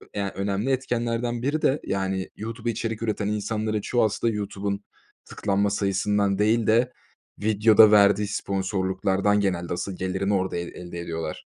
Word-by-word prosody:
ya, 100 Hz, -1 st, -2 dB
önemli 100 Hz, +5 st, -1 dB
etkenlerden 120 Hz, -2 st, -1 dB
biri 145 Hz, +5 st, -1 dB
de, 140 Hz, +3 st, +2 dB
yani, 95 Hz, -1 st, -2 dB
YouTube'a 115 Hz, +2 st, -4 dB
içerik 115 Hz, 0 st, -4 dB
üreten 110 Hz, -2 st, -1 dB
insanların 105 Hz, 0 st, -1 dB
çoğu 120 Hz, +4 st, +1 dB
aslında 110 Hz, +2 st, 0 dB
YouTube'un 100 Hz, -1 st, -3 dB, 0.4 s
tıklanma 100 Hz, 0 st, 0 dB
sayısından 100 Hz, 0 st, +1 dB
değil 110 Hz, +1 st, +2 dB
de 120 Hz, +3 st, +3 dB, 0.5 s
videoda 110 Hz, 0 st, +6 dB
verdiği 105 Hz, 0 st, +5 dB
sponsorluklardan 95 Hz, 0 st, 0 dB
genelde 90 Hz, -4 st, -1 dB
asıl 90 Hz, +2 st, -4 dB
gelirini 95 Hz, +2 st, -1 dB
orada 95 Hz, -2 st, 0 dB
el 85 Hz, 0 st, -3 dB
elde 85 Hz, -1 st, -8 dB
ediyorlar. 80 Hz, -2 st, -5 dB
105 Hz, 140 wpm, -25 LUFS, 95-110 Hz, 0.5 s, videoda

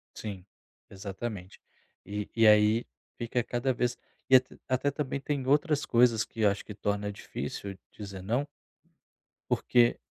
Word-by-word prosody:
Sim, 100 Hz, -4 st, -6 dB, 0.5 s
exatamente. 100 Hz, 0 st, -6 dB, 0.4 s
E 105 Hz, +1 st, -4 dB
e 115 Hz, -1 st, +5 dB
aí, 105 Hz, +2 st, +6 dB, 0.3 s
fica 120 Hz, +1 st, -1 dB
cada 120 Hz, +3 st, 0 dB
vez 125 Hz, -1 st, 0 dB, 0.3 s
e 130 Hz, -, +9 dB
at 130 Hz, -, +4 dB, 0.2 s
até 130 Hz, +2 st, +1 dB
também 140 Hz, -1 st, -3 dB
têm 140 Hz, -2 st, -2 dB
outras 145 Hz, +2 st, +2 dB
coisas 115 Hz, -2 st, +4 dB
que 110 Hz, -2 st, -3 dB
acho 100 Hz, -1 st, +2 dB
que 105 Hz, -, -8 dB
torna 105 Hz, 0 st, -1 dB
difícil 100 Hz, -1 st, -6 dB
dizer 100 Hz, -3 st, -8 dB
"não" 120 Hz, +9 st, 0 dB, 1.0 s
porque, 120 Hz, -1 st, +3 dB
115 Hz, 135 wpm, -29 LUFS, 105-130 Hz, 1.0 s, e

